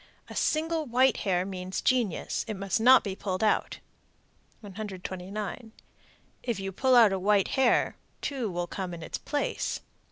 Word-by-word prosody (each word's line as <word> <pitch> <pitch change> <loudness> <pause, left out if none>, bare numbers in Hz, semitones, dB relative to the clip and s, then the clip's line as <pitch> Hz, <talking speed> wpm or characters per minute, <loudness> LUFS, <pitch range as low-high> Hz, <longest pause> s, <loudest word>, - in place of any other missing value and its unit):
A - - -8
single 320 0 0
white 255 0 +3
hair 180 -2 0
means 185 -1 -4
genius; 240 -9 0
it 215 - -3
must 195 +2 -1
not 255 +2 +7
be 195 -2 -4
pulled 190 0 -3
out. 215 - +1 0.8
129. 200 +2 -6 0.7
If 235 -5 -2
you 195 0 -4
pull 260 +6 +3
out 225 -5 +7
a 190 - -1
white 200 0 +3
hair, 265 -3 +2 0.2
two 260 -6 -2
will 175 -1 -2
come 180 -1 -5
in 165 - -9
its - - -5
place. 290 -1 -2
205 Hz, 155 wpm, -28 LUFS, 190-245 Hz, 0.8 s, not